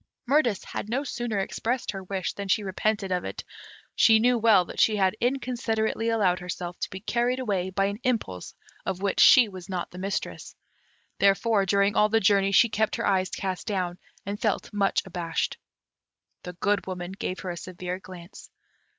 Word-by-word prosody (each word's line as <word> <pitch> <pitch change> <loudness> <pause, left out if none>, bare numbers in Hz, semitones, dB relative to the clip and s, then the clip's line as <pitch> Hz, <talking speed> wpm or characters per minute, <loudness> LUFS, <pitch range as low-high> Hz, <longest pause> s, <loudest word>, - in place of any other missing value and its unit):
Mirtis 245 -7 +2
had 210 - -6
no 260 +5 0
sooner 240 -5 -3
expressed 235 +5 -2
her 195 -2 -7
wish 185 -1 -3
than 200 -1 -6
she 205 +2 +2
repented 200 +1 -1
of 180 -1 0
it. - - -6 0.5
She 225 -1 +6
knew 245 +3 +3
well 215 -5 +5
that - - -8
she 215 - +4
had 190 -1 +2
inconsiderately 235 -3 -1
allowed 195 -6 +2
herself 180 -1 -6
to - - -3
be 190 - -7
carried 240 +3 0
away 200 -8 -1
by 195 +1 0
an 200 +1 -3
impulse 215 - -2 0.3
of 190 0 -4
which 200 - 0
she 250 -3 +8
was 190 -2 -10
not 180 -2 -4
the 180 - -9
mistress; 195 +1 -4 0.6
therefore, 200 0 +3
during 200 +1 +2
all 210 - +4
the 225 +1 +3
journey, 195 -1 +3
she 215 +4 +6
kept 220 0 0
her - - -2
eyes 190 -2 +2
cast 185 -3 -4
down, 180 -3 -2 0.3
and 200 +1 -5
felt 210 -2 -1
much 200 -1 +1
abashed. 175 -3 -3 0.8
The 180 - -8
Good 200 +3 0
Woman 180 -1 -5
gave 190 -1 -4
her 185 - -4
a - - -5
severe 180 +1 -6
glance. 180 -1 -12
200 Hz, 185 wpm, -26 LUFS, 185-220 Hz, 0.8 s, she